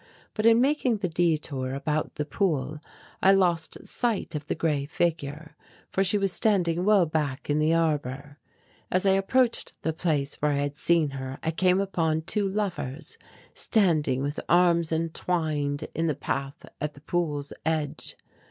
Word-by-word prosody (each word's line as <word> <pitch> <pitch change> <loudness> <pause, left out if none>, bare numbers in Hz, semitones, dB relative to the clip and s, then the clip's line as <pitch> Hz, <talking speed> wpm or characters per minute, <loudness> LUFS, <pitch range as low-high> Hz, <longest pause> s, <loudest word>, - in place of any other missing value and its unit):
But 215 +1 +1
in 230 0 +6
making 260 -3 +2
the 200 -2 -1
detour 155 -6 0
about 150 +2 -2
the 150 - -2
pool 150 -4 -1 0.4
I 195 - +6
lost 175 -4 +1
sight 230 -7 -1
of 150 -1 -5
the - - -1
grey 145 -4 0
figure, 155 -1 -2 0.4
for 195 - +2
she 195 +2 +2
was 195 -2 +1
standing 180 -5 +2
well 205 -4 +5
back 150 -3 -2
in 150 - +2
the 155 +2 +3
arbour. 145 -3 -1 0.5
As 185 +2 +1
I 195 - +5
approached 230 +6 +1
the 160 - 0
place 155 -4 -1
where 150 0 +2
I 140 - 0
had 145 0 -2
seen 160 -1 +2
her 130 0 -6
I 160 - 0
came 185 +3 +2
upon 165 -5 0
two 200 +3 0
lovers 170 -8 -4 0.3
standing 155 - +2
with 145 +2 -3
arms 170 -2 +4
entwined 160 -3 -1
in 165 +1 0
the 155 - 0
path 135 +2 -4 0.2
at 150 0 -2
the 140 - -15
pool's 150 -4 -2
edge. 155 -2 -2
160 Hz, 160 wpm, -26 LUFS, 145-180 Hz, 0.5 s, in